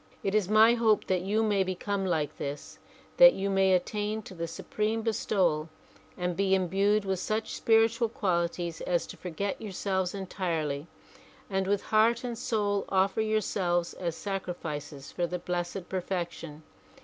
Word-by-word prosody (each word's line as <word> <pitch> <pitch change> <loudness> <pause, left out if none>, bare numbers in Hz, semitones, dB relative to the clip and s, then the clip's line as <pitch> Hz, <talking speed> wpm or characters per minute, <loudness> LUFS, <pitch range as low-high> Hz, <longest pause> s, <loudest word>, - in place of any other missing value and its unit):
It 195 - -1
is 210 -3 +2
my 220 +2 +7
hope 225 -3 +2
that 185 -2 0
you 210 +4 +1
may 205 -3 +2
become 190 +1 -2
like 155 -4 -1
this; 140 +1 -6 0.4
that - - +9
you 195 +1 -2
may 190 -1 +4
attain 210 +4 -1
to 195 - -10
the 170 -1 -4
supreme 215 +6 -2
bestowal 180 -8 +1 0.5
and 180 -1 -1
be 195 0 +2
imbued 195 +3 +2
with 190 -1 -1
such 215 +3 -2
spiritual 225 +1 +3
qualities 170 -5 -1
as 175 -1 0
to - - -9
forget 185 +3 -4
yourselves 190 -2 -2
entirely 165 -6 -3 0.6
and 190 0 0
with 200 0 +1
heart 225 +2 +3
and 240 -2 -3
soul 205 -3 0
offer 195 +2 +2
yourselves 190 -5 0
as 170 -3 -3
sacrifices 160 -8 -5
for 175 - -1
the 180 - -3
Blessed 175 +1 -4
Perfection. 175 -4 -4
190 Hz, 150 wpm, -29 LUFS, 175-210 Hz, 0.6 s, that